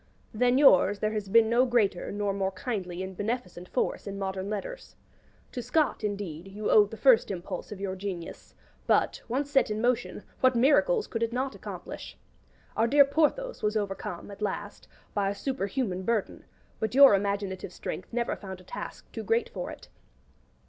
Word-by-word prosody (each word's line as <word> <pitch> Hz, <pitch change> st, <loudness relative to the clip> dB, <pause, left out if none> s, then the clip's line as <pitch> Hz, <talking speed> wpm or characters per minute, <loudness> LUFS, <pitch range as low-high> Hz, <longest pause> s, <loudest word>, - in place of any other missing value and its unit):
Than 245 Hz, +3 st, +3 dB
yours 205 Hz, -7 st, +6 dB
there 215 Hz, +1 st, -1 dB
has 210 Hz, -2 st, -3 dB
been 225 Hz, +2 st, +6 dB
no 235 Hz, +3 st, +4 dB
greater 230 Hz, -8 st, +1 dB
nor 205 Hz, -1 st, -1 dB
more 195 Hz, -1 st, 0 dB
kindly 185 Hz, -4 st, -4 dB
and 190 Hz, 0 st, -7 dB
beneficent 200 Hz, -4 st, -4 dB
force -, -, -1 dB
in 200 Hz, 0 st, -5 dB
modern 190 Hz, 0 st, -3 dB
letters. 215 Hz, -, -6 dB, 0.6 s
To 250 Hz, -, -4 dB
Scott, 260 Hz, 0 st, 0 dB
indeed, 195 Hz, -5 st, -4 dB
you 205 Hz, +2 st, -3 dB
owed 205 Hz, -1 st, +6 dB
the 225 Hz, -, -8 dB
first 255 Hz, -3 st, +5 dB
impulse 185 Hz, 0 st, -5 dB
of 205 Hz, -, -7 dB
your 195 Hz, -1 st, -3 dB
genius; 185 Hz, -3 st, -7 dB, 0.3 s
but, -, -, +2 dB
once 275 Hz, +4 st, -2 dB
set 270 Hz, -5 st, +3 dB
in 210 Hz, 0 st, -2 dB
motion, 245 Hz, -2 st, 0 dB, 0.2 s
what 255 Hz, -1 st, +4 dB
miracles 305 Hz, -, +4 dB
could 225 Hz, -, -4 dB
it 230 Hz, 0 st, 0 dB
not 260 Hz, +2 st, -2 dB
accomplish? -, -, -8 dB, 0.6 s
Our 225 Hz, -, +3 dB
dear 285 Hz, +3 st, +6 dB
Porthos 325 Hz, -, 0 dB
was 210 Hz, +1 st, +1 dB
overcome, 195 Hz, -2 st, -4 dB
at 200 Hz, -, -11 dB
last, 205 Hz, 0 st, -4 dB, 0.3 s
by 200 Hz, -1 st, +1 dB
a 200 Hz, -, -3 dB
superhuman 205 Hz, -4 st, -2 dB
burden; 220 Hz, +1 st, -2 dB, 0.3 s
but 220 Hz, +1 st, -2 dB
your 275 Hz, -4 st, +9 dB
imaginative 200 Hz, -2 st, -1 dB
strength 185 Hz, -, -6 dB
never 240 Hz, 0 st, -1 dB
found 190 Hz, -2 st, -8 dB
a -, -, -15 dB
task -, -, -7 dB
too -, -, -5 dB
great 460 Hz, +1 st, +1 dB
for -, -, -5 dB
it. -, -, -10 dB
210 Hz, 175 wpm, -28 LUFS, 195-250 Hz, 0.6 s, your